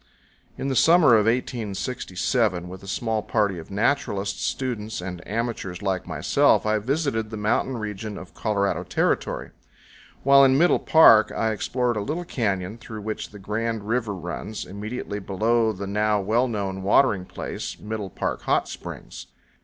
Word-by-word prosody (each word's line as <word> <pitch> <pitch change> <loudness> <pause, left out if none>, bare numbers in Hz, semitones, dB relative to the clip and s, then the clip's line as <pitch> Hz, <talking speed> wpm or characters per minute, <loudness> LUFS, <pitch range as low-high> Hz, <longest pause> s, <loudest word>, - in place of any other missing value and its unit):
IN 135 - -3
the 135 - -1
summer 165 +2 +6
of 110 -1 +4
1867, 115 -4 -1
with 95 +1 -9
a 95 - -12
small 110 +2 -1
party 105 -5 0
of 80 - -11
naturalists, 100 -2 0
students, 115 -4 -3
and 90 -1 -6
amateurs 105 -5 -3
like 95 -2 -1
myself, - - +2
I 110 0 +2
visited 125 -2 -1
the 110 - -6
mountain 110 +4 0
region 105 -1 -5
of 95 - -10
Colorado 100 -2 0
Territory. - - -1 0.7
While 140 0 +7
in 135 0 +5
Middle 175 +4 +4
Park 115 -9 +6
I 110 0 0
explored 120 +2 -1
a - - -1
little 160 +11 -3
canyon 105 - -2
through 110 -1 -8
which 110 +1 -4
the 105 - -12
Grand 110 +2 -3
River 115 -3 -1
runs, 90 +4 -5
immediately 105 +2 -5
below 110 +4 +1
the 100 -1 -6
now 105 +1 +1
well 110 +6 +1
known 100 -4 -3
watering 100 -1 +3
place, - - -6
Middle 105 -2 -5
Park - - -3
Hot - - +1
Springs. - - -8
110 Hz, 155 wpm, -24 LUFS, 100-120 Hz, 0.7 s, While